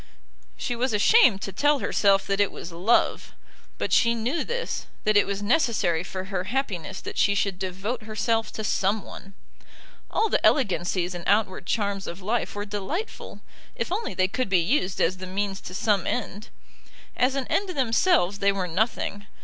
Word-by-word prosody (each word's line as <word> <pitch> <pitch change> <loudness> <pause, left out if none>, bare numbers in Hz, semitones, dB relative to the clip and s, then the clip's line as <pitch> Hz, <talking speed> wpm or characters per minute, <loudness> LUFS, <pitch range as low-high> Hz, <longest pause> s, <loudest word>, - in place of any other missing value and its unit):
She 245 - -2
was 245 +1 0
ashamed 210 - +5
to 195 - -4
tell 290 +7 +3
herself 200 -6 +2
that 195 0 -1
it 205 - +2
was 170 - -8
love. 185 +8 +1 0.4
But - - -2
she 235 0 +4
knew 250 +8 -1
this, 485 +1 -4 0.2
that 215 0 +2
it 205 - +5
was 200 0 -3
necessary 210 - +1
for 185 0 -5
her 190 -1 -3
happiness 195 - -3
that - - -6
she 200 - +3
should 200 -2 -1
devote 195 +6 -3
herself 220 +1 -1
to 215 - -4
some 205 +1 0
one. 195 0 -11 0.7
All 445 - +1
the - - 0
elegancies 185 -7 +2
and 175 -1 -6
outward 200 -3 +1
charms 200 -3 -1
of 170 - -6
life 215 +4 -2
were 205 0 -3
delightful, 210 - -5 0.3
if - - -3
only 440 +5 -2
they 185 0 +2
could 250 +4 -2
be 190 - +4
used 185 - +1
as 185 +3 +2
the 185 0 -7
means 195 +1 -2
to 185 - -8
some 200 -2 +1
end. 210 -3 -3 0.7
As 260 +2 +2
an 270 -2 -1
end 400 +8 0
themselves 255 - +2
they 200 0 +3
were 190 -2 -2
nothing. 205 +2 -1
205 Hz, 180 wpm, -25 LUFS, 190-240 Hz, 0.7 s, ashamed